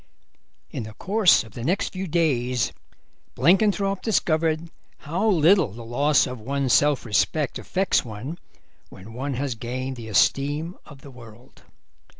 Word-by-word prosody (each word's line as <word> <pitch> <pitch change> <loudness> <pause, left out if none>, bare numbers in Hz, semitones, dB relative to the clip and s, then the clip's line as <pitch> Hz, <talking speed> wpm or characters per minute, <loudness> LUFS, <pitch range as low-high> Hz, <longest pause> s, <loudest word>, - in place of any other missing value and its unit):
In - - -4
the 110 -1 -9
course 200 -2 +3
of 110 - -14
the 115 - -7
next 180 +9 0
few 190 0 -4
days 130 -8 0 0.6
Blenkinthrope 195 - +2
discovered 165 -5 0 0.3
how 175 +9 -1
little 175 - +4
the 115 +1 -9
loss 140 +5 +2
of 125 -2 -6
one's 135 +2 -1
self 145 -3 +3
respect 135 +6 0
affects 190 +1 0
one 125 +9 -7 0.5
when 105 +5 -13
one 135 +3 -4
has 135 0 -2
gained 130 +3 -5
the 115 -2 -8
esteem 145 - +1
of 140 -2 -14
the 140 - -12
world. 120 0 -16
140 Hz, 145 wpm, -24 LUFS, 120-170 Hz, 0.6 s, little